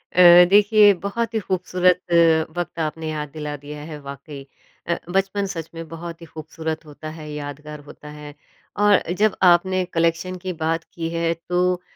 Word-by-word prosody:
अ, -, -, +2 dB, 0.3 s
देखिए 205 Hz, 0 st, +6 dB
बहुत 230 Hz, +3 st, -2 dB
ही 220 Hz, -, +1 dB
ख़ूबसूरत 180 Hz, -1 st, +1 dB, 0.6 s
वक़्त 175 Hz, -1 st, -4 dB
आपने 160 Hz, 0 st, -3 dB
याद 150 Hz, -1 st, -4 dB
दिला 150 Hz, -1 st, -5 dB
दिया 145 Hz, +1 st, -9 dB
है 150 Hz, -, -7 dB
वाक़ई। 140 Hz, 0 st, -9 dB, 0.4 s
अ, 170 Hz, 0 st, 0 dB, 0.2 s
बचपन 195 Hz, +1 st, 0 dB
सच 165 Hz, -3 st, -6 dB
में 165 Hz, 0 st, -7 dB
बहुत 165 Hz, +1 st, -8 dB
ही -, -, -9 dB
ख़ूबसूरत 160 Hz, 0 st, -6 dB
होता 155 Hz, +1 st, -9 dB
है, 155 Hz, -1 st, -9 dB
यादगार 150 Hz, +1 st, -7 dB
होता 150 Hz, +1 st, -12 dB
है 150 Hz, 0 st, -10 dB, 0.5 s
और 205 Hz, -1 st, +5 dB, 0.2 s
जब 215 Hz, -1 st, +3 dB, 0.2 s
आपने 185 Hz, +2 st, +2 dB
कलेक्शन 170 Hz, +2 st, 0 dB
की 185 Hz, -1 st, -3 dB
बात 165 Hz, +1 st, 0 dB
की 165 Hz, -1 st, -4 dB
है 165 Hz, 0 st, -1 dB, 0.2 s
तो 180 Hz, 0 st, +1 dB
165 Hz, 165 wpm, -22 LUFS, 150-185 Hz, 0.6 s, देखिए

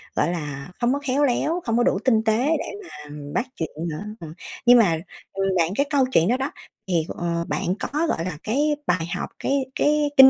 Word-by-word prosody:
gọi 170 Hz, -, +2 dB
là, 150 Hz, -2 st, -5 dB
không 245 Hz, +2 st, +3 dB
có 285 Hz, -, 0 dB
khéo 275 Hz, +3 st, +2 dB
léo, 315 Hz, +6 st, +1 dB
không 230 Hz, -1 st, +1 dB
có 240 Hz, -, +4 dB
đủ 190 Hz, -, +2 dB
tinh 220 Hz, -4 st, +4 dB
tế 220 Hz, 0 st, +3 dB, 0.2 s
để -, -, -3 dB, 0.2 s
mà 150 Hz, -, -10 dB, 0.2 s
bắt -, -, +1 dB
chuyện 160 Hz, -2 st, -3 dB, 0.2 s
nữa. 155 Hz, +5 st, -5 dB, 0.2 s
Ừm, 160 Hz, -2 st, -8 dB, 0.3 s
nhưng 245 Hz, 0 st, +8 dB
mà, 175 Hz, -8 st, +4 dB, 0.4 s
ừm, 195 Hz, 0 st, 0 dB
bạn 165 Hz, -1 st, +3 dB
cái 280 Hz, -, +2 dB
câu 280 Hz, -4 st, +4 dB
chuyện 165 Hz, -6 st, +4 dB
đó 245 Hz, +4 st, +3 dB
đó 270 Hz, +2 st, -2 dB, 0.4 s
thì, 170 Hz, -4 st, +1 dB
ờ, 170 Hz, -1 st, -2 dB
bạn -, -, -1 dB, 0.2 s
có, 310 Hz, +4 st, -1 dB
gọi 165 Hz, -, -1 dB
là, 180 Hz, -5 st, -4 dB
cái 290 Hz, +7 st, +2 dB
bài 165 Hz, -3 st, +2 dB
học, -, -, -3 dB
cái 275 Hz, -1 st, +1 dB
cái 295 Hz, 0 st, +3 dB
kinh 265 Hz, 0 st, +11 dB
225 Hz, 220 wpm, -24 LUFS, 170-275 Hz, 0.4 s, kinh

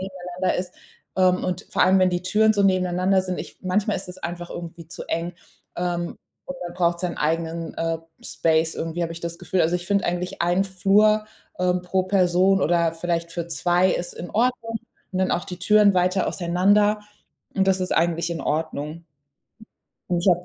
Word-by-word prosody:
nebeneinander 185 Hz, -1 st, -3 dB
ist. 180 Hz, 0 st, -5 dB, 0.4 s
Ähm, 185 Hz, -1 st, +3 dB
und 180 Hz, -, -3 dB
vor -, -, +2 dB
allem, 190 Hz, +1 st, +5 dB
wenn 185 Hz, -, +4 dB
die 175 Hz, 0 st, -1 dB
Türen 215 Hz, +4 st, +3 dB
so 200 Hz, -, +2 dB
nebeneinander 185 Hz, 0 st, +2 dB
sind 185 Hz, -1 st, -4 dB
ich -, -, -8 dB
manchmal 200 Hz, +3 st, 0 dB
ist 185 Hz, -, -7 dB
es 180 Hz, -, -8 dB
einfach 175 Hz, -1 st, -5 dB
irgendwie 170 Hz, -1 st, -8 dB
zu 170 Hz, -, -8 dB
eng, 170 Hz, +1 st, -2 dB, 0.4 s
ähm, 175 Hz, -1 st, -2 dB, 0.3 s
und 275 Hz, -, -6 dB
man 175 Hz, -, -8 dB
braucht 170 Hz, -1 st, +1 dB
seinen, 180 Hz, -2 st, -2 dB
eigenen, 165 Hz, +2 st, -1 dB
äh, 165 Hz, 0 st, -1 dB, 0.3 s
Space 160 Hz, 0 st, +1 dB
irgendwie, 165 Hz, +1 st, -3 dB
habe 165 Hz, 0 st, -2 dB
ich 170 Hz, -, -9 dB
das 170 Hz, 0 st, -5 dB
Gefühl. 180 Hz, 0 st, -1 dB
Also, 170 Hz, +2 st, +2 dB
ich 175 Hz, 0 st, -8 dB
finde 200 Hz, -1 st, +1 dB
eigentlich 180 Hz, +1 st, -3 dB
ein 175 Hz, +3 st, +2 dB
Flur, 205 Hz, +3 st, +3 dB, 0.3 s
äh, 180 Hz, 0 st, +2 dB
pro 180 Hz, +1 st, 0 dB
Person 185 Hz, 0 st, +3 dB
oder 170 Hz, 0 st, +2 dB
vielleicht 170 Hz, 0 st, -2 dB
für 170 Hz, -1 st, -3 dB
2 175 Hz, +2 st, +2 dB
ist 175 Hz, -, -3 dB
in 175 Hz, -, -7 dB
Ordnung. 230 Hz, 0 st, 0 dB, 0.4 s
Und 185 Hz, -, -2 dB
dann 190 Hz, -, +1 dB
auch 175 Hz, -, 0 dB
die 180 Hz, -, -7 dB
Türen 205 Hz, +1 st, +5 dB
weiter 185 Hz, +1 st, +2 dB
auseinander. 200 Hz, +4 st, +2 dB, 0.6 s
Und 190 Hz, 0 st, +2 dB
das 190 Hz, -1 st, +3 dB
ist 185 Hz, -, -2 dB
eigentlich 170 Hz, 0 st, +1 dB
in 170 Hz, -, -3 dB
Ordnung. 155 Hz, +1 st, -3 dB, 1.1 s
Und 175 Hz, -, +2 dB
ich 185 Hz, -, +1 dB
habe 175 Hz, 0 st, +3 dB
180 Hz, 190 wpm, -23 LUFS, 170-190 Hz, 1.1 s, allem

